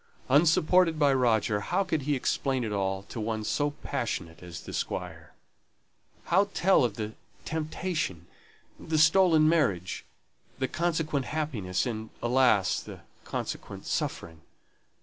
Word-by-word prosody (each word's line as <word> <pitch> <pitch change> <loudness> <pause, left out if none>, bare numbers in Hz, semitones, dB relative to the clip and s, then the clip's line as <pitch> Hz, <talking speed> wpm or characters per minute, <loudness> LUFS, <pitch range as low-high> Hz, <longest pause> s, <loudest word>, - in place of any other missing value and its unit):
Unsupported 160 +3 +4
by 145 -2 +4
Roger, 115 -5 +2
how 180 - 0
could 160 -5 -1
he 145 +2 0
explain 130 0 0
it 110 - -3
all 95 -1 -1
to 115 - -7
one 110 0 -2
so 145 +6 0
passionate 115 - -4
as 90 -2 -8
the - - -9
Squire? - - -5 0.9
how 195 +3 +2
tell 190 -5 +4
of 115 -4 0
the 110 0 -4 0.3
temptation, 155 - -3 0.5
the 160 - -2
stolen 160 0 +5
marriage, 105 - +1 0.5
the 130 - 0
consequent 155 -4 -1
happiness, 120 -13 -2
and 110 -3 -4
alas! 120 -6 +3
the - - -10 0.2
consequent - - -5
suffering? 80 -2 -3
135 Hz, 130 wpm, -28 LUFS, 105-155 Hz, 0.9 s, stolen